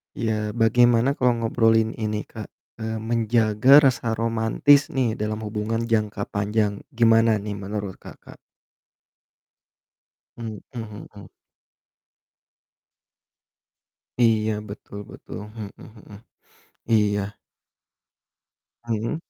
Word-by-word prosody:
Iya, 110 -2 -2
bagaimana 120 +2 +4
kalau 125 -3 +2
ngobrolin 115 -1 +3
ini 105 -2 -3
Kak, 110 -1 -9 0.3
eee, 110 0 -3
menjaga 115 +4 +4
rasa 120 -4 +1
romantis 115 +5 +3
nih 130 -4 0
dalam 105 +1 -3
hubungan 110 +2 -2
jangka 105 -2 0
panjang 105 0 0 0.2
gimana 115 -1 +4
nih 105 0 -4
menurut 100 -1 -5
Kakak? - - -14 2.0
Hmm 115 -2 -6 0.2
hmm. 105 -3 -9 3.0
Iya 110 -2 +3 0.2
betul 100 0 -9
betul, - - -10 0.2
hmm 105 -3 -7
hmm. 110 -2 -14 0.7
Iya. 105 -2 +3 1.6
Hmm. 115 +3 -2
110 Hz, 85 wpm, -23 LUFS, 105-115 Hz, 3.0 s, bagaimana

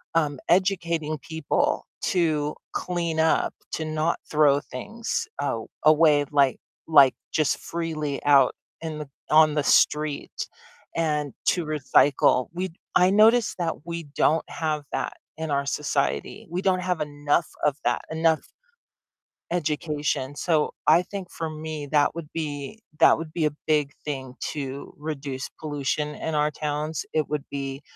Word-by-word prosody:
um, 150 -4 +2
educating 170 -4 +1
people 160 0 -1 0.2
to 155 -4 +1 0.2
clean 170 -3 -1
up, 160 - +2 0.2
to 160 - -2
not 155 +1 0
throw 145 -2 +4
things, 230 - -4
a - - -1 0.2
away, 155 -1 +5
like 140 -2 +3 0.3
like 140 -5 +7 0.2
just 155 -3 +2
freely 155 -4 -3
out 140 -3 +6 0.3
in 160 -2 -4
the 150 - -6 0.2
on 155 0 +6
the 150 - +1
street, 150 0 +2 0.5
and 150 -4 0
to 175 - +2
recycle, 145 -3 +3
we 180 0 -3 0.2
I 180 +1 +6
notice 220 +3 +5
that 165 -2 -2
we 170 0 -4
don't 160 +1 +3
have 155 -2 -2
that - - -2 0.2
in 160 -1 -3
our 140 0 +1
society, 145 +1 -1
we 175 +2 -2
don't 185 -2 +2
have 180 -2 -1
enough 145 +2 0 0.2
of 145 -1 +2
that, - - +1
enough 160 -1 +2 1.1
education, 150 -4 -1
so 155 -1 +1 0.2
I 175 - +6
think 190 -1 -7
for 165 -1 -4
me, 155 -1 -5
that 150 +1 +3
would 165 -3 -6
be 150 +5 -4 0.2
that - - +7
would 160 -1 -6
be 160 -2 +1
a 150 - +2 0.2
big 150 -2 +2
thing 135 -4 -4 0.2
to 140 -2 -5
reduce 140 -3 -5
pollution 150 0 -2
in 160 - -4
our 150 0 +3
towns, 150 0 -3
it 155 -1 0
would 150 -2 -2
be 135 0 -4
155 Hz, 145 wpm, -25 LUFS, 145-165 Hz, 1.1 s, like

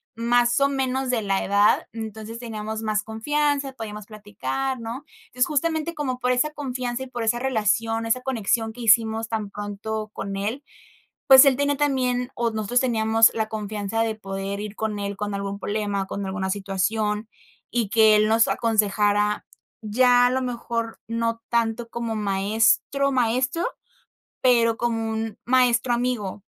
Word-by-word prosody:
más 240 +1 +2
o 280 - +4
menos, 265 -1 -1
de 240 -3 +1
la 195 -1 0
edad. 200 +1 +3
Entonces 220 0 -7
teníamos 220 -1 -5
más 215 -1 0
confianza, 280 +4 -1
podíamos 210 -4 -7
platicar, 225 +5 -4
¿no? 230 +5 -6 0.3
Es 250 +1 +2
justamente, 315 +2 -1
como 260 -4 -3
por 250 +1 +1
esa 250 +5 +1
confianza 255 -3 -4
y - - -8
por 245 -2 -5
esa 240 +2 +1
relación, 225 -2 0
esa 250 +3 +1
conexión 225 -3 -1
que 245 - -14
hicimos 225 0 +3
tan 215 -3 -3
pronto 210 +1 -5
con 195 0 -5
él, 225 +8 -3 0.6
pues 265 0 +10
él 270 -2 +4
tenía 285 0 +1
también 255 -3 0
o 235 -1 0
nosotros 220 +3 0
teníamos 225 -2 +4
la 220 -1 -1
confianza 210 0 -3
de 220 -1 -2
poder 195 -1 -5
ir 210 0 -6
con 220 -1 -2
él 200 0 -4
con 210 -1 -3
algún 200 0 -4
problema, 205 -2 -2
con 200 -1 -4
alguna 190 0 -3
situación 210 +2 -1 0.4
y 235 -4 0
que 220 -1 +5
él 215 0 +3
nos 225 +1 +4
aconsejara, 210 -2 +1 0.4
ya, 245 +3 +4
a - - 0
lo 260 0 0
mejor 235 -2 -4
no 230 0 -2
tanto 230 0 0
como 230 -1 -3
maestro, 215 +7 +1
maestro, 255 - +1 0.8
pero 235 -3 +3
como 225 -2 -1
un 220 -1 -4
maestro 245 -1 +3
amigo. 230 -5 -2
225 Hz, 160 wpm, -24 LUFS, 210-250 Hz, 0.8 s, pues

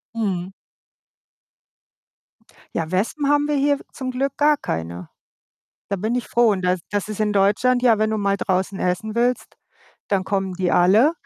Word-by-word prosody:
Mhm. 190 -5 -2 2.3
Ja, 165 0 -2
Wespen 235 +10 -1
haben 290 0 +3
wir 295 - 0
hier 285 0 +2
w - - -14
zum 260 -2 -5
Glück 275 +2 -2
gar 300 0 +4
keine. 85 - -5 0.8
Da 200 - 0
bin 220 +6 -2
ich 250 - -2
froh 235 -1 +3
und 190 -2 -1
das 180 0 +1
das 205 0 -2
ist 215 0 -6
in 210 -1 +1
Deutschland 245 +6 +2
ja, 230 -4 +4
wenn 215 0 +2
du 220 - 0
mal 200 -1 0
draußen 190 +1 -1
essen 180 +5 -1
willst, 245 +1 -1 0.5
dann 195 -2 0
kommen 195 -2 -2
die 180 -1 -1
alle 210 - +5
210 Hz, 170 wpm, -22 LUFS, 185-250 Hz, 2.3 s, alle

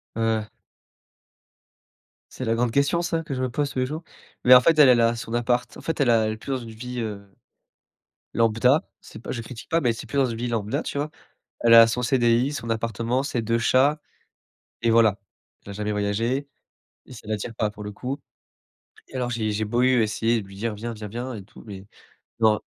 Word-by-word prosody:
Ouais, 115 - -2
ouais. 110 -1 +1 1.9
C'est 130 - -6
la 115 0 +1
grande 120 0 0
question 140 +6 +2
ça, 165 -1 -1
que 150 -4 -5
je 130 - -3
me 130 - 0
pose 145 +3 -2
tous 130 - -3
les 130 - +2
jours, 155 +5 -6 0.4
mais 125 - +8
en 125 - +8
fait 165 +2 +3
elle, 140 -3 +8
elle 120 -2 +5
a 115 +1 +3
son 115 0 -7
appart, 120 +1 0
en - - -10
fait 165 - -3
elle 135 -4 +3
a 115 -2 +4
elle 110 - -1
est - - -8
plus 135 - -7
dans 130 - 0
une 115 -2 -9
vie, 125 +2 -6
heu, 105 -3 -5 1.1
lambda. 115 +5 +3
C'est - - -12
pas - - -7
je 120 - -4
critique 115 0 -10
pas, 165 +1 +2
mais 120 -3 +2
c'est 115 - -8
plus 140 - -3
dans 135 - +4
une 115 -2 -4
vie 120 0 -2
lambda, 110 -3 -2
tu 140 - -4
vois? 150 +1 -2 0.5
Elle 115 0 +6
a 115 0 +10
son 125 +2 -2
cdi, 120 +2 +2
son 115 -5 -5
appartement, 115 +3 -1
ses 125 -4 -2
2 115 +1 0
chats, 135 +6 +3 0.8
et 115 - +3
voilà. 110 -3 +4 0.5
Elle 100 - -9
a - - -5
jamais 105 +1 -3
voyagé 115 +7 -1 0.6
et 130 - -13
ça 110 - -12
l'attire 110 +2 -3
pas 105 -2 0
pour 105 0 -10
le 105 - -6
coup, 130 +6 -5 0.9
et - - -14
alors 125 -1 -1
j'ai 110 -3 -1
j'ai 110 +1 -1
beau 120 +3 0
eu 125 -2 +4
essayer 110 +1 +1
de 100 - -12
lui 95 - -13
dire: 110 +2 -3
«Viens, 115 +2 -5
viens, 105 -1 -7
viens» 120 +4 -5
et 100 - -8
tout 100 - -16
mais 100 -2 -9 0.6
non. 110 -1 +4
115 Hz, 230 wpm, -24 LUFS, 110-130 Hz, 1.9 s, a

